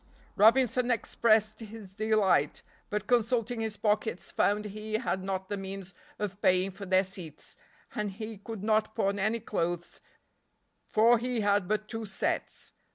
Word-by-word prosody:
Robinson 245 +3 +4
expressed 220 -2 +2
his 215 -3 -10
delight, 210 -8 +2 0.3
but 210 0 -2
consulting 235 0 +1
his 220 -2 -2
pockets 210 -3 0
found 210 +1 +1
he 215 +1 -6
had 215 -5 -1
not 190 0 -3
the 205 - -3
means 195 -1 -6 0.2
of 205 -1 -4
paying 185 +1 +3
for 195 +1 -9
their 185 +1 +4
seats, 180 -6 -7 0.4
and 210 -1 -2
he 215 0 -7
could 210 -1 -7
not 215 0 +1
pawn 200 -2 0
any 215 +4 +1
clothes, 175 -5 -3 0.9
for 230 +2 +5
he 245 -1 -1
had 205 -2 +2
but 215 +1 -1
two 225 -1 -5
sets. 195 - -3
210 Hz, 150 wpm, -30 LUFS, 195-225 Hz, 0.9 s, for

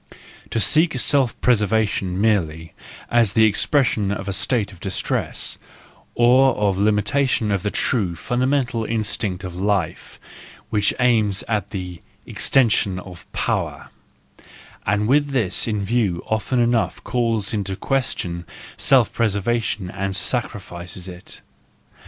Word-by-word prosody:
—To 115 - -1
seek 155 +5 +3
self 135 -1 +2
preservation 105 -5 +1
merely, 85 -7 0 0.4
is 115 -4 +4
the 110 - +4
expression 110 -1 +2
of 100 -1 -4
a 100 - -1
state 100 +1 0
of 95 - -15
distress, 95 +1 -3 0.6
or 130 +3 +5
of 100 -2 0
limitation 105 +3 +1
of 100 -2 0
the 105 - -1
true, 100 -6 0
fundamental 125 - 0
instinct 105 -4 -1
of 90 -2 -6
life, 95 -1 -2 0.5
which 105 -2 +2
aims 110 -5 +2
at 105 -3 -1
the 90 -3 -6 0.2
extension 110 -7 +2
of 90 -2 -11
power,, - - -2 1.0
and 105 +2 +1
with 145 +3 +3
this 120 -10 +1
in 105 -3 -1
view 105 -6 0
often 110 +3 -1
enough 120 -1 +1
calls 115 -4 0
in 105 -2 0
question 95 -4 -2 0.3
self 130 -4 +4
preservation 110 -3 -1
and 95 0 -3
sacrifices 95 -6 -2
it. 90 -1 -9
105 Hz, 120 wpm, -21 LUFS, 95-120 Hz, 1.0 s, or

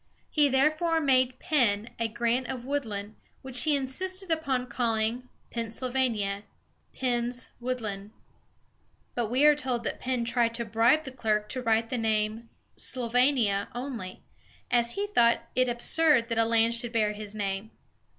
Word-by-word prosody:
He 295 -2 +4
therefore 310 +5 +2
made 255 -3 +2
Penn 240 - +1
a 230 - +1
grant 240 +3 0
of 255 -2 -5
woodland, 220 -7 -3 0.3
which 260 0 -2
he 305 -2 +4
insisted 370 +8 -2
upon 275 -6 0
calling 235 0 -1 0.2
Penn 230 -1 -3
syl 250 +3 -3
va´ni 250 -5 +1
a 200 +1 -4 0.5
("Penn's 245 -1 -2
Woodland"). 220 -5 -4 1.0
But 240 -2 -1
we 260 +5 +3
are 300 - +8
told 255 -5 -2
that - - -3
Penn 255 -2 -1
tried 235 -1 +1
to 235 0 -2
bribe 230 +8 +3
the 265 - -7
clerk 215 -4 -1
to 255 - -3
write 225 -1 +1
the 250 - -1
name 220 +1 -1 0.3
"Sylvania" 245 -4 +1
only, 240 -8 -6 0.5
as 235 -1 +2
he 405 - -1
thought 235 -13 +3
it 255 0 +2
absurd 250 +1 +2
that 230 - 0
the 225 0 +3
land 230 0 +3
should 235 0 -2
bear 215 -2 +2
his 210 0 -8
name. 200 0 -3
240 Hz, 160 wpm, -28 LUFS, 225-260 Hz, 1.0 s, are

